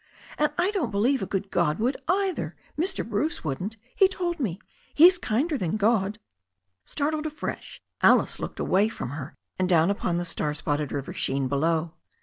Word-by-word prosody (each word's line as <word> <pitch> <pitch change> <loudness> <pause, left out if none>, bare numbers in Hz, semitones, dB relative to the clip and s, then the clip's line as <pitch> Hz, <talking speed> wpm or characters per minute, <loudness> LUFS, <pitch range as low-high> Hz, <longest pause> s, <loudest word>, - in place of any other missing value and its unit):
And 300 0 +3
I 360 +3 +2
don't 390 -7 -1
believe 235 +7 +1
a 190 - -2
good 195 0 -3
God 170 -3 +1
would 250 +5 0
either. 380 0 0 0.2
Mr. 365 - 0
Bruce 250 +10 -1
wouldn't. 180 +9 -3 0.2
He 385 - +6
told 355 -3 -3
me. 200 - -1 0.4
He's 355 +4 +7
kinder 285 +7 0
than 180 +1 -1
God." 210 -1 +2 0.7
Startled 305 +1 -1
afresh, 305 0 -6 0.2
Alice - - +4
looked - - -6
away 200 +4 +2
from 125 - -6
her 140 -2 -7 0.2
and 185 0 +1
down 170 +1 +4
upon 180 -3 -1
the 175 - -2
star 150 -3 -2
spotted 150 -1 -2
river 140 -1 -4
sheen 135 0 0
below. 160 +4 0
205 Hz, 170 wpm, -26 LUFS, -, 0.7 s, He's